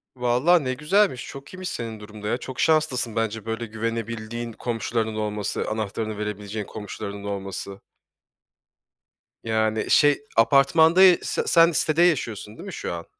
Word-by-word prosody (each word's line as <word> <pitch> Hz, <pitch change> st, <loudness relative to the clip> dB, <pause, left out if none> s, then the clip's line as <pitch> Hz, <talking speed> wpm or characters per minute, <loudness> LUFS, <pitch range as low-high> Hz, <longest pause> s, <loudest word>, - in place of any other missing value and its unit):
Vallahi 130 Hz, +7 st, +3 dB
ne 130 Hz, 0 st, -1 dB
güzelmiş, 155 Hz, +1 st, +1 dB
çok 140 Hz, +5 st, -10 dB
iyiymiş 185 Hz, 0 st, -5 dB
senin 115 Hz, -2 st, -5 dB
durum 105 Hz, 0 st, -11 dB
da -, -, -3 dB
ya, 120 Hz, -, 0 dB
çok 130 Hz, 0 st, -8 dB
şanslısın 135 Hz, -8 st, +1 dB
bence, 110 Hz, -1 st, -2 dB
böyle 115 Hz, +1 st, -3 dB
güvenebildiğin 115 Hz, +1 st, -4 dB
komşularının 115 Hz, -1 st, -2 dB
olması, 105 Hz, -1 st, -2 dB
anahtarını 110 Hz, 0 st, -3 dB
verebileceğin 105 Hz, 0 st, -4 dB
komşularının 100 Hz, -1 st, -7 dB
olması. 100 Hz, -1 st, -5 dB, 1.6 s
Yani, 110 Hz, -1 st, 0 dB
şey, 145 Hz, -1 st, +4 dB, 0.2 s
apartmanda 160 Hz, +8 st, +5 dB
ya 180 Hz, -2 st, +8 dB
se -, -, -2 dB
sen 170 Hz, 0 st, +6 dB
sitede 155 Hz, +1 st, +1 dB
yaşıyorsun 115 Hz, -, 0 dB
değil -, -, -9 dB
mi 190 Hz, -, -7 dB
şu -, -, -4 dB
an? 85 Hz, 0 st, -6 dB
115 Hz, 145 wpm, -24 LUFS, 105-140 Hz, 1.6 s, ya